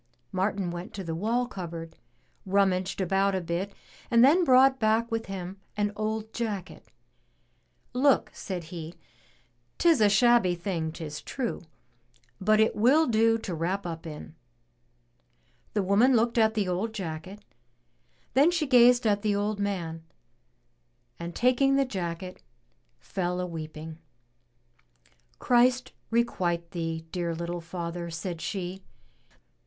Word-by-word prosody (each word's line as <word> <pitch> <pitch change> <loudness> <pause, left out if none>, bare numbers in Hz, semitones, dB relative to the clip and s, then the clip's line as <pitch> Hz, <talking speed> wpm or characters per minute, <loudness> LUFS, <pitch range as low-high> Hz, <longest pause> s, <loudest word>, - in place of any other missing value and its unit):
Martin 190 -1 -1
went 175 +1 -7
to 195 - -5
the 165 -2 -4
wall 225 +8 0
cupboard, 170 -7 -7 0.5
rummaged 190 -1 +1
about 195 +1 +1
a - - +1
bit, 175 +3 -3 0.4
and 235 0 +6
then 335 +7 +5
brought 265 -2 +5
back 220 +1 +2
with 225 0 -2
him 190 0 -6 0.2
an 205 0 +1
old 220 +1 -3
jacket. 210 -6 -5 1.1
"Look," 265 +2 +3
said 185 -3 -5
he, 165 0 -7 0.4
" 120 0 -40
'tis 330 -8 +4
a 210 - +6
shabby 215 -3 +4
thing, 170 -3 -3
'tis 155 -2 -7
true, 255 -4 -4 0.8
but 215 +3 +3
it 220 - +3
will 270 +9 +4
do 225 -2 +3
to 220 -5 -5
wrap 180 +5 -2
up 165 -1 -6
in." 150 - -9 1.4
The 205 - +2
woman 215 +7 +4
looked 230 +1 +2
at 220 0 +3
the 205 -3 0
old 195 +5 -2
jacket, 185 +2 -6 0.9
then 280 +6 +5
she 345 -3 0
gazed 245 -2 +5
at 205 -2 +2
the 210 -1 +1
old 205 +1 -1
man, 170 -5 -3 1.2
and 170 0 -6
taking 255 +2 +3
the 275 0 +3
jacket, 180 -5 -5 0.6
fell 180 - -3
a 180 - -1
weeping. 160 -1 -7 1.4
"Christ 250 +1 +3 0.2
requite 175 -7 0
thee, 165 -2 -4
dear 170 -2 -2
little 170 +1 -4
father," 170 0 -5
said 170 0 -5
she. 190 -1 -4
195 Hz, 135 wpm, -27 LUFS, 170-230 Hz, 1.4 s, and